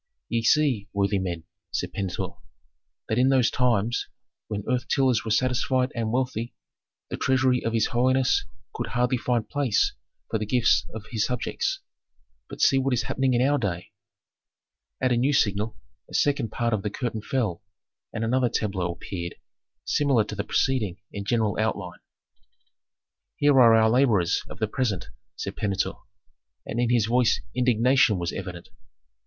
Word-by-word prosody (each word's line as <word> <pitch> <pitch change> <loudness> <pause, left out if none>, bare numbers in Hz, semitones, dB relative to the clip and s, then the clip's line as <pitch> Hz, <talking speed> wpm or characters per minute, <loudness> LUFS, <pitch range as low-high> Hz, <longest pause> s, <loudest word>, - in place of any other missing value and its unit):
"Ye 115 - 0
see, 125 -4 +2
worthy 100 0 +1
men," 85 -3 -4 0.3
said - - -3
Pentuer, 95 -3 -3 0.8
"that 110 - 0
in 130 +1 +4
those 130 -3 +3
times, 120 -2 +1 0.4
when 105 -2 -4
earth 125 0 0
tillers 130 -6 +2
were 110 - -5
satisfied 130 +2 +1
and 115 -2 -2
wealthy, 125 -2 -2 0.6
the - - -3
treasury 130 -1 +2
of 115 - -1
his 115 -1 +2
holiness 130 +2 +3 0.3
could - - -4
hardly 125 +1 0
find 120 -3 0
place 135 -6 +1 0.3
for 110 - -1
the 110 - -2
gifts 120 +1 +3
of 110 -1 -7
his 110 -3 0
subjects. 125 -1 -2 0.7
But - - -7
see 135 - +5
what 135 -1 +1
is 115 - 0
happening 130 0 0
in 125 +2 +3
our 145 0 +2
day." 90 -6 -3 1.1
At 130 -1 +1
a 120 - +3
new 135 +5 +2
signal 105 -4 +1 0.3
a - - -7
second 140 -5 +1
part 115 0 -1
of 105 - 0
the 105 - -2
curtain 115 -1 -4
fell, 105 -8 -2 0.5
and 110 - -3
another 125 +2 +2
tableau 95 -6 -1
appeared, 85 0 -6 0.5
similar 140 -6 +2
to - - -7
the - - -2
preceding 110 -9 0
in 100 -1 -6
general 110 -2 0
outline. 100 -5 -2 1.4
"Here 145 0 +4
are 115 -2 +7
our 110 0 +5
laborers 110 -8 +3
of - - -9
the 110 - 0
present," 105 -5 -2 0.3
said - - -5
Pentuer, 100 -1 -1 0.7
and 115 - -4
in 120 -1 +2
his 120 -3 +3
voice 120 +1 +2
indignation 125 -2 +3
was 85 -1 -3
evident. 90 -3 -7
115 Hz, 160 wpm, -25 LUFS, 105-130 Hz, 1.4 s, are